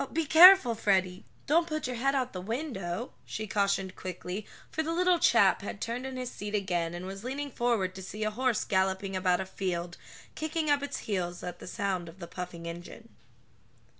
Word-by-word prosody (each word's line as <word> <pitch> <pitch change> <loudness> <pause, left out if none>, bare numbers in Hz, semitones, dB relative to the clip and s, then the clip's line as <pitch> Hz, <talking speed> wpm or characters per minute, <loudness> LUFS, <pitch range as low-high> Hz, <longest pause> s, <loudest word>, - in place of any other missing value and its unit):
Be 330 0 0
careful, 330 -4 +9
Freddie, 190 -4 0 0.2
don't 330 +4 +3
put 310 -2 -3
your 250 0 -3
head 275 +3 +1
out 255 -2 0
of - - -26
the 185 - -5
window," 225 - -4
she 215 - -5
cautioned 195 -2 0
quickly, 185 +2 -6 0.2
for 315 - -1
the 320 +1 -2
little 355 +1 +3
chap 205 -10 +4
had 200 0 -6
turned 240 +4 -3
in 260 -1 -6
his 250 -1 -4
seat 205 +1 -5
again, 175 -4 -1
and 175 +1 -6
was 195 +2 -7
leaning 280 +3 -4
forward 230 -7 0
to 190 - -8
see 210 +3 -5
a 215 - 0
horse 250 0 0
galloping 190 0 0
about 185 -1 +2
a - - -4
field, 175 -2 -3 0.4
kicking 315 -1 -1
up 285 -1 +3
its 285 - -4
heels 180 -4 -2
at 175 0 -6
the - - -10
sound 185 -3 -2
of 165 - -14
the 180 - -7
puffing 175 -1 -7
engine. 175 +7 -8
205 Hz, 200 wpm, -29 LUFS, 185-260 Hz, 0.4 s, careful